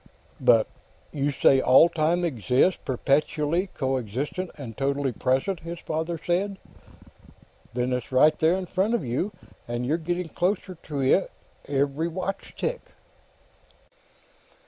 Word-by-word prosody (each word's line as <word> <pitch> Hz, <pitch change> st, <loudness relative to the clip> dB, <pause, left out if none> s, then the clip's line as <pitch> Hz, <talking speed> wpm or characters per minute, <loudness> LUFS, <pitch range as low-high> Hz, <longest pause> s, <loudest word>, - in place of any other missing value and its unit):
"But -, -, +5 dB, 0.5 s
You 145 Hz, -1 st, 0 dB
say 135 Hz, -1 st, +4 dB
all 130 Hz, +6 st, +7 dB
time 170 Hz, +1 st, +1 dB
exists, 130 Hz, -, +2 dB
perpetually 150 Hz, +6 st, 0 dB
coexistent 135 Hz, -, -3 dB
and 120 Hz, -7 st, -8 dB
totally 140 Hz, 0 st, 0 dB
present," 135 Hz, -, 0 dB
his 170 Hz, +1 st, -7 dB
father 160 Hz, +1 st, -3 dB
said. 190 Hz, +3 st, 0 dB, 1.2 s
"Then 125 Hz, +1 st, 0 dB
it's 125 Hz, 0 st, -3 dB
right 140 Hz, +4 st, +5 dB
there 160 Hz, +2 st, +4 dB
in 190 Hz, 0 st, -2 dB
front 195 Hz, +6 st, 0 dB
of 235 Hz, -, -2 dB
you, 125 Hz, -, -1 dB, 0.4 s
and 120 Hz, +1 st, -3 dB
you're 150 Hz, +6 st, +1 dB
getting 175 Hz, +1 st, -3 dB
closer 185 Hz, +2 st, -1 dB
to 150 Hz, -4 st, -5 dB
it, 135 Hz, +8 st, +3 dB, 0.4 s
every 140 Hz, +3 st, 0 dB
watch 185 Hz, +3 st, -5 dB
tick." -, -, -2 dB
155 Hz, 125 wpm, -26 LUFS, 130-175 Hz, 1.2 s, all